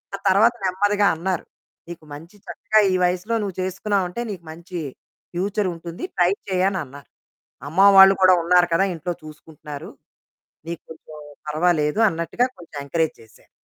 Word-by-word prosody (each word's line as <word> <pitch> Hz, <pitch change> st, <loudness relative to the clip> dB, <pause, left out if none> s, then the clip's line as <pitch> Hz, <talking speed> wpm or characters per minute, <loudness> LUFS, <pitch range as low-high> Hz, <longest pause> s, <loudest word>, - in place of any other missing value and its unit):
ఆ -, -, -6 dB
తర్వాత 215 Hz, +5 st, +5 dB
నెమ్మదిగా 205 Hz, +2 st, +2 dB
అన్నారు, 180 Hz, +1 st, -3 dB, 0.4 s
"నీకు 170 Hz, -2 st, -10 dB
మంచి 165 Hz, +7 st, -12 dB
చక్కగా 195 Hz, +5 st, +1 dB
ఈ -, -, +2 dB
వయసులో 180 Hz, +6 st, 0 dB
నువ్వు 195 Hz, -3 st, -4 dB
చేసుకున్నావంటే, 190 Hz, +2 st, -2 dB
నీకు 175 Hz, -4 st, -8 dB
మంచి 170 Hz, +2 st, -8 dB, 0.5 s
ఫ్యూచర్ 195 Hz, +2 st, -1 dB
ఉంటుంది, 170 Hz, -, -9 dB
ట్రై 180 Hz, 0 st, +3 dB, 0.2 s
చెయ్యి" 185 Hz, 0 st, +1 dB
అనన్నారు. 145 Hz, -8 st, -7 dB, 0.6 s
"అమ్మ 170 Hz, +5 st, -3 dB, 0.2 s
వాళ్ళు 195 Hz, 0 st, +9 dB
కూడా 185 Hz, -1 st, +7 dB
ఉన్నారు 175 Hz, 0 st, +4 dB
కదా! 195 Hz, +4 st, +3 dB
ఇంట్లో 175 Hz, +2 st, -4 dB
చూసుకుంటున్నారు 150 Hz, -1 st, -10 dB, 0.8 s
నీకు 170 Hz, -2 st, -5 dB
కొంచెం 155 Hz, -1 st, -13 dB, 0.3 s
పర్వాలేదు" 155 Hz, +2 st, +1 dB
అన్నట్టుగా 170 Hz, +10 st, -1 dB
కొంచెం 160 Hz, -3 st, -12 dB
ఎంకరేజ్ 160 Hz, +2 st, -1 dB
చేశారు. 110 Hz, -, -21 dB
180 Hz, 140 wpm, -22 LUFS, 160-190 Hz, 0.8 s, వాళ్ళు